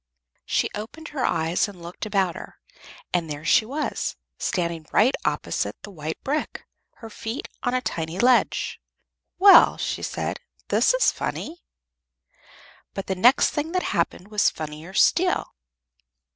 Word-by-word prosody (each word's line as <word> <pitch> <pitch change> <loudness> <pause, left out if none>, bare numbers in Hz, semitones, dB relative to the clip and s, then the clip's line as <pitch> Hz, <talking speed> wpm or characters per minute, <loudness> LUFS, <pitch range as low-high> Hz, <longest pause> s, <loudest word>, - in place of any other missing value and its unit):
She - - +1
opened 235 +10 -7
her 275 -4 -3
eyes 165 +4 +1
and 200 -3 -11
looked 170 +5 -7
about 195 -4 +1
her, - - -10 0.6
and 170 -3 0
there 145 +1 -6
she 220 - +4
was, 295 +5 -2 0.2
standing 170 -3 -2
right 250 +5 +4
opposite - - -1
the 205 - -9
white 160 -3 -5
brick, 295 +3 -3 0.3
her 225 - -10
feet 225 +4 -5
on 245 0 0
a 255 - +1
tiny 165 -5 -4
ledge. 245 +4 +2 0.6
"Well," 390 +1 +8
she - - -3
said, - - -3 0.3
"this - - +3
is - - +4
funny." 335 +2 -5 1.3
But 195 - -4
the 190 - -1
next 245 +8 +5
thing 310 +3 -3
that 365 - +1
happened 190 - -1
was 210 -1 +3
funnier 155 +4 -8
still. 360 +9 +2
210 Hz, 145 wpm, -24 LUFS, 170-270 Hz, 1.3 s, Well